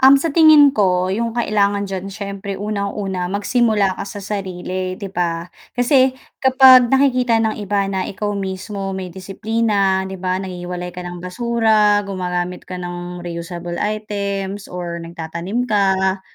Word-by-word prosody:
Um, 270 Hz, +1 st, +7 dB
sa 330 Hz, -, 0 dB
tingin 305 Hz, -3 st, +6 dB
ko 185 Hz, -3 st, +2 dB
yung 230 Hz, +4 st, -1 dB
kailangan 205 Hz, -3 st, +1 dB
diyan 195 Hz, +1 st, -5 dB
syempre 200 Hz, 0 st, -5 dB
unang-una 200 Hz, -3 st, -3 dB
magsimula 205 Hz, -2 st, +1 dB
ka -, -, -4 dB
sa 205 Hz, 0 st, -7 dB
sarili, 185 Hz, -2 st, -4 dB
'di 195 Hz, +2 st, -6 dB
ba? 170 Hz, -2 st, -2 dB, 0.2 s
Kasi 255 Hz, +1 st, +3 dB, 0.2 s
kapag 260 Hz, -2 st, +6 dB
nakikita 255 Hz, -4 st, +3 dB
ng 220 Hz, -1 st, 0 dB
iba 205 Hz, -1 st, -1 dB
na 190 Hz, -1 st, -1 dB
ikaw 205 Hz, +1 st, -3 dB
mismo 195 Hz, +1 st, -4 dB
may 190 Hz, -1 st, -5 dB
disiplina 195 Hz, +1 st, 0 dB
'di 190 Hz, -1 st, -7 dB
ba, 185 Hz, 0 st, 0 dB
naghihiwalay 180 Hz, -1 st, -5 dB
ka 180 Hz, -, -7 dB
ng 175 Hz, 0 st, -6 dB
basura, 215 Hz, 0 st, +2 dB
gumagamit 180 Hz, -2 st, -4 dB
ka 185 Hz, -, -5 dB
ng 175 Hz, 0 st, -6 dB
reusable 175 Hz, 0 st, -5 dB
items 200 Hz, -2 st, -3 dB
or 175 Hz, -1 st, -5 dB
nagtatanim 170 Hz, +7 st, -4 dB
ka, 190 Hz, -3 st, +1 dB
195 Hz, 145 wpm, -19 LUFS, 180-215 Hz, 0.2 s, Um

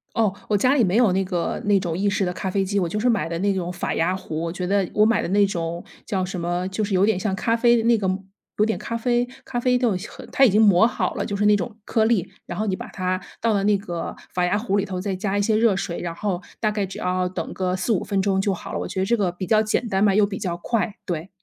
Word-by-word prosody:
哦， 215 Hz, -4 st, +2 dB
我 210 Hz, -, +1 dB
家 255 Hz, +6 st, +3 dB
里 260 Hz, -, +4 dB
没 185 Hz, -1 st, +1 dB
有 225 Hz, -5 st, +5 dB
那 190 Hz, +1 st, +1 dB
个 180 Hz, -2 st, -2 dB
那 205 Hz, -1 st, +4 dB
种 175 Hz, -4 st, -3 dB
意 200 Hz, +2 st, +1 dB
式 200 Hz, -1 st, 0 dB
的 180 Hz, -, -1 dB
咖 190 Hz, +1 st, -3 dB
啡 195 Hz, +1 st, +1 dB
机， 200 Hz, +1 st, 0 dB
我 175 Hz, -, 0 dB
就 190 Hz, -, -3 dB
是 240 Hz, +4 st, +2 dB
买 225 Hz, -7 st, +1 dB
的 165 Hz, 0 st, -3 dB
那 200 Hz, +2 st, +2 dB
种 180 Hz, -2 st, -3 dB
法 175 Hz, -, -3 dB
压 180 Hz, +3 st, +1 dB
壶。 160 Hz, -4 st, -5 dB
我 165 Hz, -, -2 dB
觉 180 Hz, +1 st, -4 dB
得 195 Hz, -1 st, +1 dB
我 210 Hz, 0 st, +4 dB
买 230 Hz, -, +3 dB
的 -, -, -3 dB
那 200 Hz, +3 st, +4 dB
种 170 Hz, -3 st, -3 dB, 0.2 s
叫 190 Hz, -2 st, -1 dB
什 185 Hz, 0 st, -4 dB
么， 175 Hz, +1 st, -1 dB
就 200 Hz, +3 st, -2 dB
是 200 Hz, -, -4 dB
有 190 Hz, +2 st, +4 dB
点 215 Hz, -4 st, +1 dB
像 190 Hz, 0 st, -1 dB
咖 230 Hz, +4 st, +1 dB
啡 240 Hz, 0 st, +5 dB
的 230 Hz, -, +1 dB
那 230 Hz, 0 st, +4 dB
个 200 Hz, -3 st, -1 dB, 0.5 s
有 210 Hz, -, +4 dB
点 220 Hz, -, -1 dB
咖 230 Hz, -, -3 dB
啡 240 Hz, +1 st, +1 dB, 0.2 s
咖 245 Hz, -2 st, -3 dB
啡 250 Hz, 0 st, +2 dB
豆 245 Hz, -5 st, +2 dB, 0.4 s
它 270 Hz, -, +5 dB
已 245 Hz, -, +6 dB
经 210 Hz, +3 st, +4 dB
磨 205 Hz, +1 st, +6 dB
好 -, -, -2 dB
了， -, -, -2 dB
就 200 Hz, -, -3 dB
是 205 Hz, +1 st, 0 dB
那 210 Hz, 0 st, +6 dB
种 210 Hz, +3 st, -5 dB
颗 220 Hz, +1 st, +1 dB
粒。 215 Hz, -6 st, +1 dB
然 -, -, -6 dB
后 215 Hz, -, -1 dB
你 190 Hz, -3 st, -1 dB
把 -, -, -7 dB
它 185 Hz, -1 st, -2 dB, 0.2 s
倒 230 Hz, -1 st, +2 dB
到 200 Hz, -, +1 dB
那 205 Hz, 0 st, +3 dB
个 175 Hz, -4 st, -5 dB, 0.2 s
法 180 Hz, -1 st, +1 dB
压 190 Hz, +3 st, +1 dB
壶 210 Hz, -2 st, 0 dB
里 200 Hz, -, +1 dB
头， 185 Hz, -2 st, -4 dB
再 195 Hz, 0 st, -2 dB
加 200 Hz, +1 st, -1 dB
一 -, -, +2 dB
些 215 Hz, +1 st, +2 dB
热 225 Hz, -3 st, +4 dB
水， 175 Hz, -2 st, -3 dB
然 170 Hz, -1 st, -4 dB
后 190 Hz, -1 st, -2 dB, 0.2 s
大 215 Hz, -, +2 dB
概 205 Hz, -2 st, -1 dB
只 190 Hz, -, -9 dB
要 180 Hz, 0 st, 0 dB
等 180 Hz, -, -5 dB
个 185 Hz, -1 st, -1 dB
4-5 185 Hz, +2 st, 0 dB
分 200 Hz, -2 st, 0 dB
钟 195 Hz, -1 st, +1 dB
就 195 Hz, 0 st, +1 dB
好 180 Hz, -, -7 dB
了， -, -, -3 dB
我 -, -, -3 dB
觉 190 Hz, -, -3 dB
得 190 Hz, -, +1 dB
这 235 Hz, +3 st, +2 dB
个 190 Hz, -5 st, 0 dB
比 185 Hz, +1 st, -5 dB
较 215 Hz, +2 st, +4 dB
简 220 Hz, +2 st, -1 dB
单 190 Hz, -1 st, 0 dB
嘛， 200 Hz, -2 st, +4 dB
又 210 Hz, 0 st, +5 dB
比 200 Hz, -1 st, -5 dB
较 175 Hz, -3 st, -2 dB
快， 210 Hz, +3 st, -1 dB
对。 170 Hz, 0 st, -4 dB
200 Hz, 320 characters per minute, -23 LUFS, 185-215 Hz, 0.5 s, 已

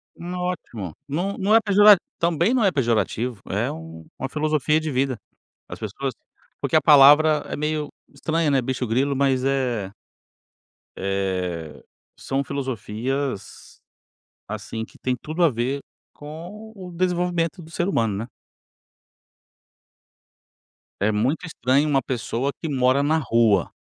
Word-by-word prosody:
N 175 Hz, +1 st, -7 dB
ótimo. 120 Hz, -, -4 dB
Não 180 Hz, +8 st, -2 dB
não 205 Hz, +3 st, +3 dB
é -, -, +8 dB
pejora 205 Hz, -1 st, +7 dB, 0.2 s
também 170 Hz, -, +2 dB
não 245 Hz, -4 st, +2 dB
é 195 Hz, -, +4 dB
pejorativo, 120 Hz, -, 0 dB
é -, -, 0 dB
um 80 Hz, 0 st, -9 dB
uma 130 Hz, -, -4 dB
filosofia 155 Hz, 0 st, +1 dB
de 155 Hz, -1 st, -3 dB
vida, 130 Hz, -2 st, 0 dB, 0.5 s
as -, -, -8 dB
pessoas 120 Hz, +5 st, -4 dB, 0.5 s
porque -, -, +1 dB
a -, -, +6 dB
palavra 150 Hz, +2 st, +7 dB
é -, -, -4 dB
meio 150 Hz, 0 st, -2 dB, 0.2 s
estranha, 160 Hz, -2 st, -1 dB
né, 135 Hz, -2 st, +2 dB
"bicho-grilo", 130 Hz, +2 st, 0 dB
mas, 135 Hz, -1 st, +1 dB
eh 120 Hz, -8 st, -1 dB, 1.0 s
eh, 90 Hz, -5 st, -3 dB, 0.3 s
são 135 Hz, +1 st, -2 dB
filosofias, 130 Hz, -2 st, -4 dB, 0.7 s
assim 110 Hz, 0 st, -5 dB
que -, -, -18 dB
têm 130 Hz, -, -1 dB
tudo 160 Hz, +7 st, -1 dB
a 160 Hz, -, +5 dB
ver 130 Hz, +4 st, -2 dB, 0.3 s
com 175 Hz, +9 st, -10 dB
o 185 Hz, -3 st, -9 dB
desenvolvimento 175 Hz, -1 st, -1 dB
do 160 Hz, -, -13 dB
ser 175 Hz, +3 st, -1 dB
humano, 115 Hz, -, +1 dB
né. 115 Hz, +3 st, -6 dB, 2.7 s
É 105 Hz, +2 st, +3 dB
muito 125 Hz, +12 st, 0 dB
estranho 140 Hz, -1 st, +1 dB
uma 135 Hz, -2 st, +3 dB
pessoa 125 Hz, +2 st, -2 dB
que 160 Hz, -, -3 dB
mora 130 Hz, 0 st, +3 dB
na 155 Hz, +3 st, +2 dB
rua, 115 Hz, -, +2 dB
140 Hz, 135 wpm, -23 LUFS, 115-160 Hz, 2.7 s, é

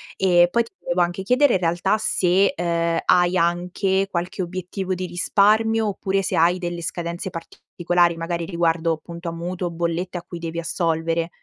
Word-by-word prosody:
E 175 Hz, -2 st, +4 dB
poi 235 Hz, +6 st, +2 dB
ti 230 Hz, -, -17 dB
volevo 175 Hz, +1 st, 0 dB
anche 175 Hz, +2 st, -1 dB
chiedere 250 Hz, +5 st, +3 dB
in -, -, +1 dB
realtà 175 Hz, +4 st, +1 dB
se, 195 Hz, -2 st, +2 dB
uhm, 170 Hz, -1 st, 0 dB
hai 175 Hz, 0 st, +4 dB
anche 180 Hz, +3 st, 0 dB
qualche 180 Hz, +1 st, -3 dB
obiettivo 185 Hz, +1 st, -4 dB
di 185 Hz, 0 st, -3 dB
risparmio, 215 Hz, +5 st, +2 dB
oppure 195 Hz, -1 st, -1 dB
se 190 Hz, -, -2 dB
hai 170 Hz, +2 st, +4 dB
delle 175 Hz, -1 st, -4 dB
scadenze 170 Hz, +2 st, -4 dB
particolari, 175 Hz, 0 st, -1 dB
magari 165 Hz, 0 st, -3 dB
riguardo 165 Hz, -1 st, 0 dB
appunto 170 Hz, +2 st, -8 dB
a -, -, -4 dB
mutuo, 175 Hz, +1 st, -4 dB
bollette 170 Hz, +2 st, -2 dB
a 170 Hz, -, -7 dB
cui 175 Hz, -, -7 dB
devi 165 Hz, 0 st, -4 dB
assolvere. 165 Hz, 0 st, -1 dB
175 Hz, 170 wpm, -22 LUFS, 170-190 Hz, -, E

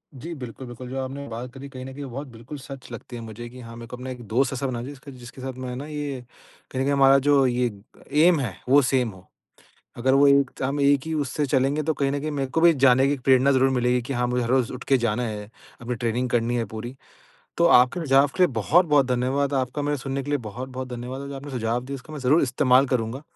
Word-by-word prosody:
जी 160 Hz, +6 st, -7 dB
बिल्कुल, 130 Hz, -3 st, -8 dB
बिल्कुल 120 Hz, +1 st, -9 dB
जो 135 Hz, -, -5 dB
आपने 140 Hz, +2 st, -6 dB
बात 120 Hz, +1 st, -6 dB
करी 140 Hz, 0 st, -9 dB
कहीं 130 Hz, -1 st, -8 dB
न 135 Hz, -, -8 dB
कहीं 140 Hz, +1 st, -7 dB
बहुत 135 Hz, +3 st, -6 dB
बिल्कुल 120 Hz, +6 st, -9 dB
सच 135 Hz, -2 st, -10 dB
लगती 120 Hz, +1 st, -8 dB
है 115 Hz, -, -6 dB
मुझे 115 Hz, +1 st, -8 dB
कि 125 Hz, +1 st, -12 dB
हाँ, 115 Hz, 0 st, -10 dB
मेरे 115 Hz, 0 st, -9 dB
को -, -, -6 dB
अपना 130 Hz, +1 st, -7 dB
एक 125 Hz, -1 st, -7 dB
दोस्त 125 Hz, +5 st, +1 dB
ऐसा 135 Hz, +1 st, -2 dB
बना 120 Hz, -2 st, -3 dB
जिसका 140 Hz, +1 st, -9 dB
जिसके 125 Hz, 0 st, -12 dB
साथ 130 Hz, 0 st, -4 dB
मैं 125 Hz, -1 st, -4 dB
ना 140 Hz, +3 st, -6 dB
ये 145 Hz, -4 st, -4 dB, 0.5 s
कहीं 130 Hz, -, -2 dB
न -, -, +2 dB
कहीं 140 Hz, +1 st, +1 dB
हमारा 135 Hz, 0 st, +6 dB
जो 140 Hz, -2 st, +5 dB
ये 125 Hz, -1 st, 0 dB, 0.5 s
ऐम 175 Hz, -3 st, +5 dB
है 115 Hz, -10 st, -3 dB
वो 140 Hz, +2 st, +7 dB
सेम 125 Hz, -3 st, +1 dB
हो। 95 Hz, -1 st, -16 dB, 0.7 s
अगर 130 Hz, +2 st, +2 dB
वो 140 Hz, +1 st, +6 dB
एक 140 Hz, -1 st, +5 dB
त -, -, -9 dB
हम 140 Hz, +2 st, -1 dB
एक 140 Hz, 0 st, +4 dB
ही 160 Hz, -, -3 dB
उससे 145 Hz, -1 st, -1 dB
चलेंगे 135 Hz, +2 st, +1 dB
तो 160 Hz, +1 st, 0 dB
कहीं 140 Hz, -2 st, 0 dB
न 145 Hz, -, -1 dB
कहीं 155 Hz, +2 st, -3 dB
मेरे 135 Hz, -2 st, -2 dB
को 165 Hz, -, +1 dB
भी 170 Hz, -1 st, +7 dB
जाने 130 Hz, -1 st, +4 dB
की 145 Hz, +1 st, 0 dB
प्रेरणा 130 Hz, +1 st, +5 dB
ज़रूर 135 Hz, 0 st, +4 dB
मिलेगी 125 Hz, -1 st, +1 dB
कि 130 Hz, +4 st, -5 dB
हाँ, 125 Hz, -1 st, 0 dB
मुझे 125 Hz, 0 st, 0 dB
हर 115 Hz, -, -3 dB
रोज़ 130 Hz, -2 st, +2 dB
उठ 125 Hz, -, -7 dB
के 135 Hz, -, +4 dB
जाना 120 Hz, 0 st, 0 dB
है, 105 Hz, -2 st, -5 dB, 0.3 s
अपनी 125 Hz, +1 st, -3 dB
ट्रेनिंग 120 Hz, +2 st, -1 dB
करनी 120 Hz, 0 st, +1 dB
है 115 Hz, -, -1 dB
पूरी। 115 Hz, +4 st, -7 dB, 0.6 s
तो 170 Hz, -, +4 dB
आपके 130 Hz, +1 st, +5 dB
सुझाव 140 Hz, -2 st, +4 dB
के 185 Hz, -, +4 dB
लिए 180 Hz, -, +6 dB
बहुत-बहुत 150 Hz, -, +3 dB
धन्यवाद, 135 Hz, +3 st, 0 dB
आपका 130 Hz, +2 st, -1 dB
मुझे 145 Hz, 0 st, -1 dB
सुनने 135 Hz, +1 st, -4 dB
के 145 Hz, -, -7 dB
लिए 145 Hz, -, +2 dB
बहुत-बहुत 130 Hz, +3 st, -6 dB
धन्यवाद 125 Hz, +3 st, -6 dB
और 140 Hz, -, -7 dB
जो 140 Hz, -, -6 dB
आपने 140 Hz, +1 st, -8 dB
सुझाव 120 Hz, -1 st, -1 dB
दिया 140 Hz, -, -5 dB
उसका 135 Hz, +4 st, -11 dB
मैं 150 Hz, -, -5 dB
ज़रूर 140 Hz, +5 st, +3 dB
इस्तेमाल 130 Hz, 0 st, +4 dB
करूँगा, 125 Hz, +1 st, -2 dB
130 Hz, 260 wpm, -24 LUFS, 125-140 Hz, 0.7 s, वो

